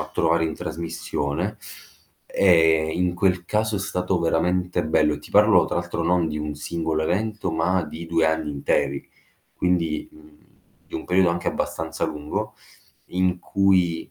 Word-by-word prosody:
a - - -5
trovare 85 0 +2
in 80 -1 -2
trasmissione. 85 +2 -3 0.7
E 80 -4 +4
in 90 0 0
quel 90 -1 +1
caso 110 +3 0
è - - -1
stato 90 -1 -1
veramente 90 +1 0
bello, 80 -1 +2
e - - -7
ti - - -14
parlo 105 -3 +6
tra - - -3
l'altro 85 -1 -2
non 85 0 +2
di 75 -1 -3
un 75 0 -4
singolo 80 +1 -2
evento, 105 +2 -1
ma 85 +2 +1
di 80 +2 -8
2 80 -1 +2
anni 80 -1 0
interi, 70 -1 -1 0.5
quindi, 85 -3 0
mhmm, 75 -1 -18 0.5
di - - -14
un - - -4
periodo 90 -1 +3
anche 85 0 -2
abbastanza 80 0 -3
lungo, 75 0 -4 0.5
in 90 0 0
cui 90 -4 +1
85 Hz, 155 wpm, -23 LUFS, 80-90 Hz, 0.7 s, parlo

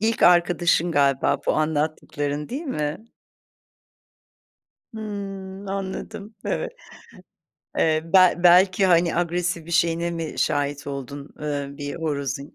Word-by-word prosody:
İlk 225 +1 0
arkadaşın 175 -1 +4
galiba 140 -2 +2
bu - - +3
anlattıkların 150 -1 -2
değil 275 +7 -4
mi? 155 - -3 1.9
Hımm, 195 -2 -6
anladım. 195 +2 -5
Evet. - - -2 1.1
Eee, 155 -1 +2
be 185 -2 +6
belki 185 +2 +6
hani, 170 -2 +3
agresif 175 -1 -1
bir 170 - -9
şeyine 170 0 +1
mi 165 -2 -4
şahit 145 -1 -1
oldun, 140 +1 -6
ııı, 140 -2 -4
bir 145 0 -5
horozun? 140 -3 -3
170 Hz, 110 wpm, -23 LUFS, 145-190 Hz, 1.9 s, be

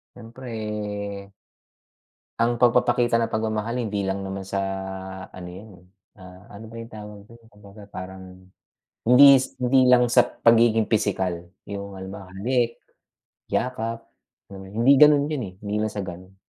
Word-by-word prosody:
Siyempre 120 +3 -11 1.9
Ang 120 +1 +1
pagpapakita 120 0 +3
ng 115 - -2
pagmamahal 110 +2 -2
hindi 105 -4 -2
lang 95 0 -3
naman 95 0 -5
sa 100 +1 -4 0.7
ano 90 -1 -10
yan, 100 +4 -11
eh, 90 - -22 0.3
ah, 90 +1 -14
ano 110 - -10
ba 115 - -13
yung 115 - -12
tawag 105 -2 -10
dun? 115 - -15
Kumbaga 105 -1 -15
parang 95 -1 -10 0.6
hindis 135 +1 +7
hindi 130 +1 +3
lang 125 -1 +5
sa - - +5
pagiging 115 -1 +3
pisikal, 95 -5 -1 0.2
yung 100 -1 -7
halimbawa 95 0 -9
halik, 120 +3 0 0.7
yakap, 115 -2 -2 0.5
hmm, 95 -1 -10
hindi 130 +5 +5
ganun 150 -1 +6
yun, 145 -5 -2
eh, 95 - -11
hindi 105 0 -4
lang 110 0 -1
sa 105 - -3
ganun. 95 +1 -9
110 Hz, 140 wpm, -24 LUFS, 95-120 Hz, 1.9 s, hindis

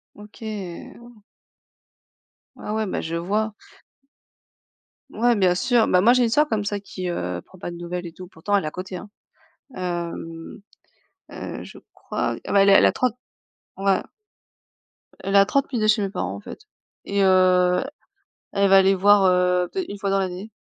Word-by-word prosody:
OK, 210 +2 -15 0.6
oh. 235 -3 -16 1.3
Ah 210 - -5
ouais. 220 -1 -1
Bah - - -3
je 165 +1 -4
vois. 210 +5 -1 1.6
Ouais 240 +2 +2
bien 185 -3 +3
sûr, 235 +4 +2
bah 180 0 +4
moi, 235 +3 +6
j'ai 250 -1 +3
une - - +2
soeur 300 +6 +3
comme 210 -2 -1
ça 205 -1 -2
qui, 185 -2 -6
heu, 90 - -3
prend 190 - -17
pas 175 - -6
de 170 - -8
nouvelles 175 +1 -5
et 165 - -8
tout 180 +1 -11
pourtant 200 +4 -4
elle 195 - 0
est - - -2
à - - -2
côté, 185 +1 -7 0.7
hem, 170 0 -5 0.7
heu, - - -7
je - - -12
crois. - - -3
Ah - - -4
beh, 200 - +5
elle 200 - +4
elle 195 - +7
a - - +3
30 250 -2 -1 0.6
ouais. 195 0 +2 1.2
Elle 195 +1 -3
est - - +9
à 195 - +6
30 275 +3 0
minutes 215 -3 +1
chez 215 -1 +3
mes 195 - -2
parents 95 - -3
en 100 - -8
fait - - -10 0.4
et 200 0 0
heu, 185 +1 +4 0.7
elle 200 -1 +2
va 195 - +7
aller 195 0 +5
voir, 200 +1 +5
heu, 180 -1 +2
peut-être 375 -2 -4
une 200 - -7
fois 200 - -2
dans 195 - +2
l'année. 190 +3 -4
195 Hz, 185 wpm, -23 LUFS, 180-210 Hz, 1.6 s, est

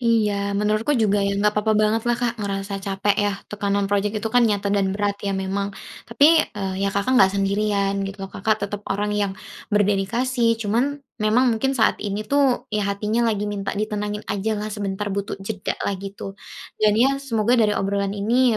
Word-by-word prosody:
Iya 230 -3 +2 0.2
menurutku 215 +6 +1
juga 205 -3 +2
ya 200 0 0
nggak 210 +1 +2
papa 215 +1 +2
banget 215 +1 +2
lah, 240 - +2
Kak, 235 -2 -2
ngerasa 200 0 -3
capek 195 +1 0
ya, 205 - +1 0.2
tekanan 200 -1 0
project 205 +1 0
itu 220 +1 -2
kan 245 -1 +5
nyata 200 -1 0
dan 195 -1 +1
berat 205 -1 -1
ya 200 -1 -2
memang. 195 +1 -3 0.3
Tapi, 295 +8 +6 0.2
eee, 190 -2 -3
ya 200 - +1
Kakak 200 +5 0
gak 190 0 +5
sendirian 200 0 0
gitu 195 - -8
loh, 195 - -9
Kakak 215 0 0
tetap 205 0 -5
orang 205 +1 -1
yang 200 -2 -1 0.3
berdedikasi 230 +4 +1
cuman 250 +7 -1 0.2
memang 235 +4 +3
mungkin 270 +4 0
saat 220 - +2
ini 205 +1 -3
tuh 270 0 +2
ya 210 -1 0
hatinya 215 +4 0
lagi 210 -1 -1
minta 205 -1 -3
ditenangin 210 0 -3
ajalah 210 +1 -2
sebentar 200 -1 -3
butuh 200 0 -3
jeda 195 0 -4
lah 200 - 0
gitu. 195 0 -7 0.5
Dan 210 0 +4
ya 275 +4 +3
semoga 230 -4 0
dari 210 -1 +2
obrolan 200 +1 -1
ini 235 +3 +2
210 Hz, 185 wpm, -22 LUFS, 200-225 Hz, 0.5 s, Tapi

